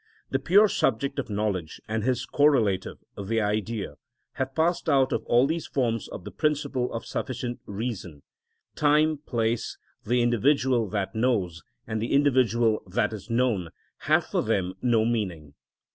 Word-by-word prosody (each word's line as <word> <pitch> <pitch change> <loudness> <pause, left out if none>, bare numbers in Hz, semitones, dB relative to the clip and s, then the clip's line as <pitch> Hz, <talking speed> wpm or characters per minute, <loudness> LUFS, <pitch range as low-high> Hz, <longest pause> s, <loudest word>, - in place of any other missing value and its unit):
The 135 - +1
pure 195 +10 +5
subject 140 - 0
of 135 - -4
knowledge 100 -6 -2
and 110 0 -2
his 125 0 0
correlative, 120 -11 +2 0.3
the 115 +3 0
Idea, 105 -5 -2 0.4
have 130 0 -3
passed 165 +2 +1
out 135 -1 +3
of - - -1
all 120 +2 +4
these 160 +3 -2
forms 115 -5 -1
of 90 - -8
the - - -8
principle 140 -5 -1
of 115 - -5
sufficient 120 -1 -4
reason: 100 - -5 0.5
time, 150 +1 +3
place, 115 -5 -2 0.3
the 120 +2 +2
individual 120 -1 +2
that 95 -2 -2
knows, 105 -9 0 0.2
and 110 -1 -3
the 115 - -2
individual 120 -5 +3
that 110 +4 0
is 105 +1 -8
known, 115 -7 +1 0.3
have - - +2
for - - -1
them 95 -1 0
no 115 -3 +3
meaning. 90 -11 -2
120 Hz, 150 wpm, -26 LUFS, 105-135 Hz, 0.5 s, pure